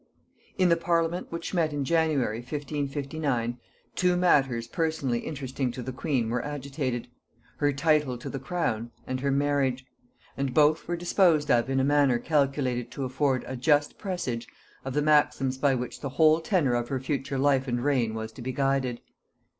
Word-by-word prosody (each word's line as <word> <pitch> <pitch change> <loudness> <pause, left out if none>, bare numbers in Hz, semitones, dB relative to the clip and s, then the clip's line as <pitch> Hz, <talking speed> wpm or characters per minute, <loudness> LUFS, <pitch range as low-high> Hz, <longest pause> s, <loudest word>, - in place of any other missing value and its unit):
In 185 -2 +4
the 170 - +5
parliament 170 +1 0
which 170 +2 -5
met 165 -4 +1
in 145 -2 -2
January 150 -8 +1
1559, 140 -2 -3 0.4
two 180 -1 +2
matters 135 -10 +2
personally 145 -5 -1
interesting 135 -3 -3
to 125 - -6
the 130 - -4
queen 125 -4 -1
were 125 - -1
agitated; 135 -4 -3 0.5
her 145 -1 +2
title 145 -3 +1
to 120 - -9
the 135 - -4
crown, 130 -6 -2 0.2
and 130 0 -3
her 140 +2 -1
marriage; 135 -2 +1 0.5
and 135 -2 -2
both 155 +1 +4
were 175 - -1
disposed 170 -4 +3
of 120 +1 +3
in 135 0 +1
a - - +2
manner 140 -3 +3
calculated 135 -3 0
to 135 - -3
afford 130 0 0
a 130 - -5
just 145 +3 +2
presage 155 - -3 0.4
of 135 0 -5
the 150 - +2
maxims 145 -3 +2
by 140 -1 +3
which 125 -1 -5
the 140 - -3
whole 155 +4 +4
tenor 160 - +1
of 120 0 0
her 135 - -1
future 135 0 -2
life 135 0 +2
and 120 -1 -1
reign 125 -6 +1
was 110 0 -5
to 125 - -11
be 130 +2 -3
guided. 135 -2 0
140 Hz, 175 wpm, -27 LUFS, 125-150 Hz, 0.5 s, the